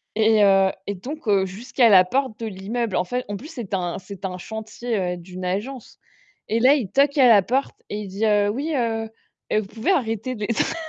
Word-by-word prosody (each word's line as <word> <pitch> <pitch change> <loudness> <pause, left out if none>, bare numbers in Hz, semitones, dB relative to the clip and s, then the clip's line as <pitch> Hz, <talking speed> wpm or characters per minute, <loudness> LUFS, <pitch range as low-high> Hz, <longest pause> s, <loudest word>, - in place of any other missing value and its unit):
Et 220 -1 +4
heu, 195 -1 +5 0.2
et 205 - -1
donc 275 +8 -8
heu, 195 -2 +3
jusqu'à 230 +5 +1
la 185 -2 +7
porte 255 +2 -1
de 225 - -4
l'immeuble. 210 +2 -3
En 180 - +2
fait 250 +7 -3
en 205 - -4
plus, 285 - -10
c'était 215 -7 -5
un 175 -2 -2
c'était 195 0 -7
un 180 -1 -6
chantier, 220 +3 -5 0.2
heu, - - -9
d'une 180 +1 -9
agence. 220 +8 -4 0.5
Et 225 +1 +1
là, 260 +4 +6
il 240 -10 -2
toque 280 +2 +3
à 260 - +7
la 210 -3 +7
porte 265 +6 -1
et 210 - -4
il 205 - -6
dit: 200 +4 -2
«Heu, 205 -1 +3
oui 290 +8 -2
heu, 225 -3 -1 0.4
vous 215 -1 +1
pouvez 225 - -1
arrêter 245 - -1
de 215 - -10
les 210 - -1
tr» 325 - 0
220 Hz, 225 wpm, -23 LUFS, 195-250 Hz, 0.5 s, la